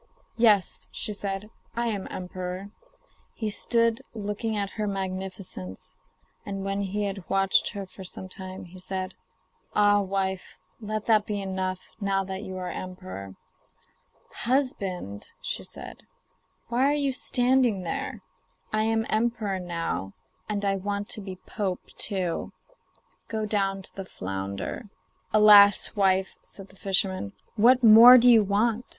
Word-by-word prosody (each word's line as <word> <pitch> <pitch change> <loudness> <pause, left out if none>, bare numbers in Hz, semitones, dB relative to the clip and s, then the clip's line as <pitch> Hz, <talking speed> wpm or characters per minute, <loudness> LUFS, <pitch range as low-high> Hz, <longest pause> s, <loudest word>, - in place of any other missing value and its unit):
'Yes,' 215 -5 +3
she 210 - -2
said, 200 +1 -4 0.2
'I 235 +1 0
am 210 -4 -2
emperor.' 185 +2 -6 0.6
He 215 -2 -2
stood 230 +1 +1
looking 210 +1 -2
at 200 -1 -2
her 215 -1 -3
magnificence, 185 - -5 0.5
and 195 -1 -5
when 195 0 -1
he 200 +1 -2
had 195 -2 -4
watched 195 +2 +3
her 200 -2 -5
for 190 +1 -12
some 185 +1 -8
time, 185 0 -8
said: 185 0 -4 0.6
'Ah, 205 0 +5
wife, 190 -1 -2 0.2
let 215 -1 -4
that 215 -2 +3
be 210 -1 -2
enough, 190 -1 -3
now 195 -1 +1
that 190 0 -5
you 190 -3 -6
are 180 -1 -4
emperor.' 95 - -7 1.0
'Husband,' 195 - -1 0.2
said - - -5
she, - - -21 0.6
'why 245 +3 +2
are - - +2
you 280 -2 0
standing 245 -5 +2
there? 170 - -4 0.5
I 215 0 +2
am 225 0 +1
emperor 215 -3 0
now, 165 - -3 0.4
and 205 -1 -1
I 195 0 +1
want 200 +1 -3
to 215 - -4
be 190 -2 -7
pope 195 -4 -3
too; 185 -5 -2 0.7
go 220 -1 -2
down 195 -2 0
to - - -9
the 195 - -6
flounder.' 95 - -5 0.4
'Alas! 210 -1 +7
wife,' 190 -1 +2
said 195 -1 -9
the 190 - -18
fisherman, 190 - 0 0.2
'what 245 +3 +5
more 230 +3 +11
do 245 0 +7
you 225 -2 +7
want? 215 +4 +1
200 Hz, 140 wpm, -27 LUFS, 185-215 Hz, 1.0 s, more